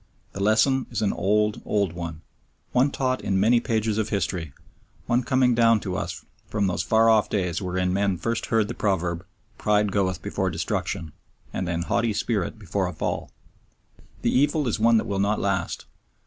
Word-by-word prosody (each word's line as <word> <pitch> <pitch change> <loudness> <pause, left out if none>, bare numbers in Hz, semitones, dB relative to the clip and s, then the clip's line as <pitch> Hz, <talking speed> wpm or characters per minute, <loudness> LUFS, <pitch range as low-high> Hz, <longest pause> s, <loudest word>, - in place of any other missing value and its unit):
The 100 - -6
lesson 110 +6 +3
is - - -2
an 100 - +1
old, 105 +2 +1
old 100 -5 0
one 85 -2 -6 0.5
one 130 +3 +3
taught 130 -2 -1
in 95 -1 0
many 115 +4 +4
pages 110 -2 0
of 110 0 -1
history, 90 -6 -2 0.5
one 120 +1 +2
coming 130 0 +2
down 115 -1 +4
to 90 -2 -3
us 90 -2 -4 0.2
from 105 -2 0
those 90 - 0
far 110 0 +3
off 110 -2 +4
days 90 -5 -1
wherein 90 0 -1
men 100 -1 +1
first 115 +5 -2
heard 110 -2 +2
the 120 - -4
proverb, 85 -6 -1 0.4
"Pride 105 -1 +2
goeth 95 -3 0
before 95 -1 -1
destruction, 80 -1 -3 0.4
and 90 - -2
an 85 0 -1
haughty 115 +5 0
spirit 105 -2 -1
before 100 -2 -2
a 90 - -5
fall." - - -3 0.9
The - - +1
evil 145 +2 +2
is 115 - -1
one 115 +1 +5
that - - 0
will 100 -1 -2
not 105 +2 +1
last. 95 -4 -1
100 Hz, 180 wpm, -25 LUFS, 90-115 Hz, 0.9 s, one